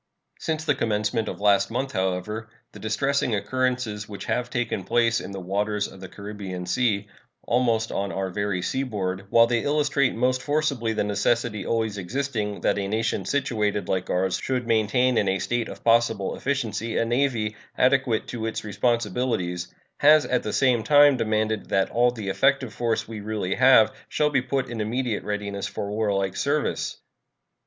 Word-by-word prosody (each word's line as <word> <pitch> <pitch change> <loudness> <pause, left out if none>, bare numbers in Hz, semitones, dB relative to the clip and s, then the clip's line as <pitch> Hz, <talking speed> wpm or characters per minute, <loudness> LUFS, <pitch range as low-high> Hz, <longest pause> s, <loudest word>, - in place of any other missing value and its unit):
Since 155 -1 -2
the 150 - +3
commencement 110 -1 -1
of - - -4
the - - -11
last 100 -1 +4
month, 130 +3 -2
however, 95 +4 -2 0.2
the - - -12
distressing 130 +2 0
occurrences 125 -2 -1
which 100 - -7
have 125 0 -1
taken 120 -6 -2
place 115 +3 +2
in - - -7
the 100 - -6
waters 100 +3 -1
of 95 - -13
the 95 - -8
Caribbean 100 -3 -7
Sea, 105 0 +1 0.4
almost 115 -2 +1
on 100 0 -2
our 95 -1 -3
very 100 -2 -2
seaboard, 100 -6 -2
while 115 +2 +6
they 120 0 +1
illustrate 145 -1 +1
most 130 +2 +1
forcibly 145 -6 0
the 110 - 0
necessity 105 +1 0
always 110 -3 -1
existing 105 0 -3
that - - +1
a 100 - -2
nation 110 -2 -1
situated 105 -6 0
like 95 -1 -1
ours 95 0 0
should 125 -2 -1
maintain 115 +2 +2
in 100 - +1
a 95 - +1
state 120 +4 -2
of - - -10
possible 115 -3 +2
efficiency 115 -5 -2
a - - +2
navy 120 -3 0 0.2
adequate 130 -3 +2
to 115 -2 -3
its 115 - -4
responsibilities, 105 -5 -1 0.3
has 150 +1 +6
at 125 - +1
the 105 - -4
same 125 -4 +3
time 145 +2 +6
demanded 110 -2 -1
that 95 -1 +1
all 120 +1 +4
the 110 -5 -5
effective 135 +2 +2
force 115 +1 -1
we 110 -1 -6
really 105 -3 -2
have 130 -3 +6 0.2
shall 150 -1 +1
be 135 -3 +2
put 135 +1 -1
in 115 -2 -4
immediate 115 +1 -1
readiness 100 -1 -3
for 100 - -5
warlike 100 -3 0
service. 145 +6 -1
110 Hz, 170 wpm, -25 LUFS, 100-125 Hz, 0.4 s, while